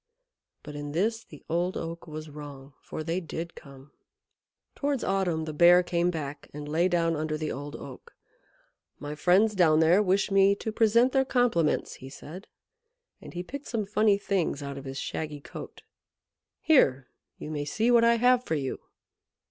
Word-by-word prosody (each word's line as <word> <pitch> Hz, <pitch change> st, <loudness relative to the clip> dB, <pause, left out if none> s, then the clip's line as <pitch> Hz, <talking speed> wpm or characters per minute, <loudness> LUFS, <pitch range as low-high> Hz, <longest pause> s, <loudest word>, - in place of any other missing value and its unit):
But 150 Hz, -1 st, -9 dB
in 145 Hz, 0 st, -6 dB
this 225 Hz, +7 st, 0 dB
the 150 Hz, -, -15 dB
Old 175 Hz, +3 st, -1 dB
Oak 165 Hz, +1 st, -6 dB
was 155 Hz, 0 st, -7 dB
wrong, 145 Hz, -2 st, -10 dB
for 155 Hz, -, -6 dB
they 165 Hz, +3 st, -1 dB
did 170 Hz, -1 st, -6 dB
come. 140 Hz, -1 st, -14 dB, 0.8 s
Towards 280 Hz, -3 st, -2 dB
autumn 180 Hz, -5 st, 0 dB
the 155 Hz, -, -5 dB
Bear 175 Hz, +3 st, +6 dB
came 175 Hz, 0 st, 0 dB
back 150 Hz, -4 st, -6 dB
and 150 Hz, 0 st, -6 dB
lay; 165 Hz, +4 st, +2 dB
down 165 Hz, -2 st, +1 dB
under 155 Hz, 0 st, -2 dB
the 155 Hz, 0 st, -3 dB
Old 145 Hz, +2 st, -6 dB
Oak. 470 Hz, -, -11 dB, 0.8 s
"My 145 Hz, 0 st, -6 dB
friends 185 Hz, +8 st, +3 dB
down 165 Hz, -5 st, +4 dB
there 165 Hz, +5 st, +5 dB
wish 195 Hz, +1 st, +1 dB
me 195 Hz, 0 st, +5 dB
to 220 Hz, -, -5 dB
present 230 Hz, +3 st, +3 dB
their 270 Hz, 0 st, +3 dB
compliments," 245 Hz, -, +1 dB
he 130 Hz, -, -9 dB
said, 165 Hz, +7 st, -10 dB, 0.7 s
and -, -, -11 dB
he 175 Hz, -, -3 dB
picked 280 Hz, +9 st, -8 dB
some 220 Hz, -3 st, -2 dB
funny 210 Hz, 0 st, +3 dB
things 190 Hz, -7 st, -1 dB
out 140 Hz, 0 st, -5 dB
of 135 Hz, -, -12 dB
his 135 Hz, 0 st, -6 dB
shaggy 150 Hz, +1 st, -4 dB
coat. 150 Hz, -, -10 dB, 0.8 s
"Here 135 Hz, -, +3 dB, 0.3 s
you 150 Hz, -, -7 dB
may 145 Hz, -1 st, -3 dB
see 220 Hz, +11 st, +1 dB
what 235 Hz, -1 st, +5 dB
I 235 Hz, 0 st, +5 dB
have 245 Hz, +1 st, +3 dB
for 160 Hz, -, -2 dB
you." 135 Hz, -3 st, -3 dB
170 Hz, 175 wpm, -27 LUFS, 150-205 Hz, 0.8 s, Bear